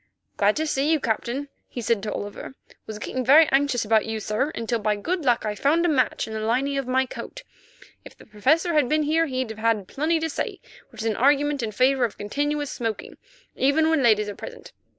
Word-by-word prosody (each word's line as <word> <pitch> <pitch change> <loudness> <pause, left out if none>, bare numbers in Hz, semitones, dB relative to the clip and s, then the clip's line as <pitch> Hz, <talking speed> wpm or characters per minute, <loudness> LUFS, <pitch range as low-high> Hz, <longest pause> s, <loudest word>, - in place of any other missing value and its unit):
"Glad 205 +1 +2
to 315 - -1
see 295 0 0
you, 320 - +3
Captain," 240 +3 -2 0.2
he - - -7
said 230 -2 0
to 210 +1 -4
Oliver. 205 +5 -6 0.3
"Was 215 - -6
getting 255 +4 -4
very 295 +5 +7
anxious 270 -4 +2
about 220 0 +2
you, 220 0 -3
sir, 215 +7 -1
until 230 0 -2
by 210 0 0
good 335 - -3
luck 245 -4 +2
I 210 - -1
found 300 +10 +2
a - - +3
match 270 -4 +1
in 220 - -7
the 220 - -3
lining 260 +6 0
of 270 - -5
my 260 +1 +2
coat. - - -9 0.6
If - - -14
the - - -16
Professor 305 - +1
had 295 -5 +2
been 305 0 +2
here 325 +2 +2
he'd 255 -4 -3
have 220 - -9
had 220 -4 0
plenty, 310 +4 0
which 320 -6 -6
is - - -4
an 220 -2 0
argument 285 +2 +2
in 225 -2 -3
favour 255 +4 +2
of 230 - -1
continuous 290 +7 -2
smoking, 225 -3 -5 0.4
even 310 +4 +2
when 320 -3 +2
ladies 215 -4 +3
are 205 - -4
present. 485 -1 -10
255 Hz, 215 wpm, -24 LUFS, 220-295 Hz, 0.6 s, very